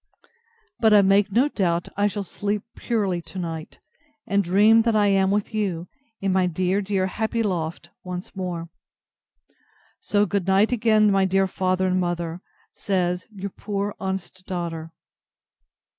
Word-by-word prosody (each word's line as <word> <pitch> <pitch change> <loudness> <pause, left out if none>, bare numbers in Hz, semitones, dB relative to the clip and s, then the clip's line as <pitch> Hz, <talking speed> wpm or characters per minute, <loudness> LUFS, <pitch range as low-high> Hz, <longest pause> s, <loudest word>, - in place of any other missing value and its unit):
But 220 -2 +5
I 205 - +7
make 200 +1 +3
no 245 +7 +4
doubt 175 -10 0
I 205 +1 +2
shall 205 0 -3
sleep 205 +2 -3
purely 200 -7 -1
to 190 - -11
night, 165 -3 -5 0.5
and 200 0 +1
dream 210 +5 +5
that 230 -1 +1
I 210 -1 +4
am 195 -1 +3
with 205 +2 -1
you, 185 -5 -2 0.3
in 195 -1 0
my 185 -1 +3
dear, 185 +3 0
dear, 195 -1 0
happy 220 +4 -1
loft 170 -5 -3
once 180 +2 -7
more. 175 -3 -4 1.3
So 205 0 +1
good 195 -1 -2
night 195 +4 +4
again, 215 -3 +4
my 195 -1 +3
dear 195 +1 +2
father 185 0 0
and 185 0 +1
mother, 175 -1 -2 0.3
says 180 -2 -1
Your 200 -2 -6
poor 200 0 -3
honest 190 -1 -4
DAUGHTER. 165 -3 -4
190 Hz, 150 wpm, -24 LUFS, 180-205 Hz, 1.3 s, I